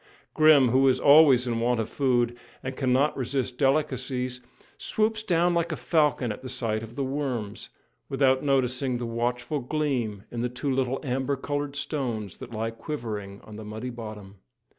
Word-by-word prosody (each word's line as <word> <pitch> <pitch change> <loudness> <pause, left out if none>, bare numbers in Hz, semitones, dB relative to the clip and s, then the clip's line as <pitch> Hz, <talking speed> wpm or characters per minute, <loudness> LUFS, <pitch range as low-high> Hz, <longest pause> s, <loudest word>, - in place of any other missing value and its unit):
Grim, 155 -5 +6
who 130 +3 +4
is 130 - +3
always 140 -4 +7
in 115 -2 -1
want 120 0 +1
of 110 - -1
food 120 -3 +1 0.3
and 130 0 -4
cannot 130 +2 +2
resist 130 -1 -2
delicacies, 130 -3 0 0.4
swoops 220 - 0
down 175 -4 +2
like 170 0 0
a - - -1
falcon 135 -2 +1
at 130 +4 -7
sight 110 -3 -1
of 115 +1 -10
the 140 - -1
"worms," 130 -6 -3 0.4
without 130 -1 +3
noticing 130 -2 +1
the 120 - -4
watchful 120 +5 -2
gleam 125 -7 -2
in 120 - -3
the 125 - 0
two 125 +3 -3
little 130 0 0
amber 135 +1 -1
coloured 145 +1 -3
stones 125 - -2
that - - -9
lie 115 0 -3
quivering 110 -6 -6
on 105 -1 -11
the 110 - -7
muddy 110 +4 -6
bottom. 105 -4 -9
130 Hz, 165 wpm, -26 LUFS, 115-140 Hz, 0.4 s, always